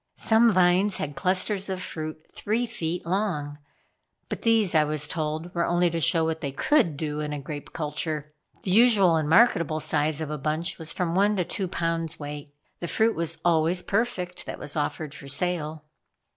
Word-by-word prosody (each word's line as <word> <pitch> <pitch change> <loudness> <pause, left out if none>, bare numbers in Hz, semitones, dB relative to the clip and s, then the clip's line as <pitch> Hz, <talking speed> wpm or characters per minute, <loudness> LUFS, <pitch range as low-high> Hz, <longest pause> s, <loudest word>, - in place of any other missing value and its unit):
Some 225 +1 +4
vines 185 +1 +3
had 145 -1 -4
clusters 190 +6 0
of 190 -1 -3
fruit 155 -2 -6
three 225 +4 -1
feet 170 -5 -4
long; 170 -6 -2 0.7
but - - -4
these 225 -5 +3
I 155 -2 +5
was 150 -1 0
told 160 +1 -3
were 170 - 0
only 175 0 +2
to 165 - -1
show 160 +2 +3
what 160 0 -2
they 140 - -3
could 170 - +2
do 150 -1 -3
in 150 -1 -3
grape 145 +1 -7
culture. 150 -1 -3 0.3
The 185 - -2
usual 205 -5 +5
and 155 -2 0
marketable 165 -5 +4
size 155 0 +1
of 155 -2 -4
a 150 - -4
bunch 155 +6 -2
was 160 0 0
from 175 -3 -2
one 200 +3 +3
to 180 -3 0
two 190 +2 -2
pounds 165 -2 -2
weight. 145 -1 -7 0.3
The 170 - -4
fruit 220 +5 +2
was 165 0 -1
always 170 +1 +2
perfect 195 -5 -2
that - - -5
was 145 - -7
offered 150 0 -2
for 140 - -11
sale. 155 0 -2
165 Hz, 185 wpm, -26 LUFS, 150-185 Hz, 0.7 s, I